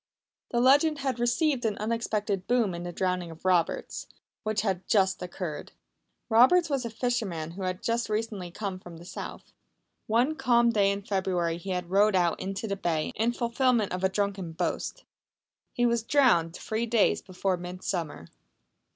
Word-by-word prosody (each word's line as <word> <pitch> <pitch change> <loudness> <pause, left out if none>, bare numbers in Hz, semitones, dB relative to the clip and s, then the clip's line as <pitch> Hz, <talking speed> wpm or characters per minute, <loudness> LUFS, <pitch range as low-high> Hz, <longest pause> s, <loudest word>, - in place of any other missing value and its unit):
The 240 - 0
legend 285 +5 +5
had 265 -3 -1
received 250 +2 +1
an 215 -3 0
unexpected 215 -3 -2
boom 235 -6 +2
in 170 - -5
the 175 0 -5
drowning 180 -1 -1
of 165 +2 -13
Roberts, 180 -3 0 0.3
which 215 -1 -1
had 190 -3 -2
just 190 -2 +2
occurred. 175 -4 -5 0.5
Roberts 275 +9 +5
was 270 -3 0
a - - -2
fisherman 220 -9 -2
who 190 +3 -8
had 185 0 -3 0.2
recently 210 -4 -2
come 190 0 -5
from 175 -2 -11
the 170 - -12
South. - - -8 0.5
One 245 +8 +2
calm 235 -1 +4
day 205 -3 +3
in 200 0 -4
February 185 -4 0
he 190 - -8
had 180 -1 -3
rowed 205 +1 +4
out 175 -2 +2
into 195 +3 -4
the 200 - -1
bay 165 -5 -1
in 230 +2 +1
fulfilment 235 -3 +1
of 180 +1 -3
a 190 - +4
drunken 195 -4 -2
boast. - - -3 0.7
He 245 - +1
was 235 -1 +2
drowned 220 - +3
three 220 +2 -2
days 225 -3 +3
before 185 0 -1
Midsummer. 175 - -5
200 Hz, 165 wpm, -28 LUFS, 180-235 Hz, 0.7 s, legend